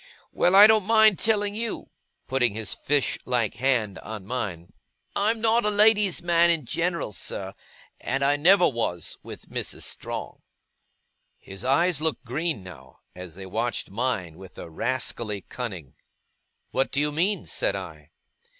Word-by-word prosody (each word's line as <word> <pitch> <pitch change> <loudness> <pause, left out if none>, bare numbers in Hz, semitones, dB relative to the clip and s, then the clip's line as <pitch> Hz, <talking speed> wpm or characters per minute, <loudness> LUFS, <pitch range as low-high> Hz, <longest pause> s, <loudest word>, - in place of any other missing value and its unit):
Well, 180 +2 +2
I 200 +1 +11
don't 215 -2 +4
mind 220 -3 +5
telling 205 -2 +1
you,' 225 +1 -3 0.4
putting 125 -5 +1
his 110 -3 -1
fish 145 -1 0
like 120 -4 0
hand 120 -6 0
on 105 -3 -8
mine, 95 -8 -5 0.4
'I'm 220 +2 +1
not 230 +1 +3
a 210 - +2
lady's 210 -3 +4
man 170 0 +4
in 165 -5 +1
general, 170 -4 -2
sir, 95 0 -5 0.5
and 135 0 -1
I 145 +1 +3
never 180 +5 +5
was, 115 - -3
with - - -11
Mrs. - - -4
Strong.' - - -6 1.0
His 95 -1 -9
eyes 150 +5 +2
looked 155 -4 -1
green 155 - -2
now, 65 -8 -14
as 90 -3 -9
they 95 0 -9
watched 115 +5 -3
mine 100 -8 -2
with 95 -1 -13
a 85 - -9
rascally 115 -1 -2
cunning. 95 - -7 0.8
'What 135 - 0
do 140 - 0
you 150 0 +1
mean?' 185 +7 0
said - - 0
I. - - -8
135 Hz, 150 wpm, -25 LUFS, -, 1.0 s, I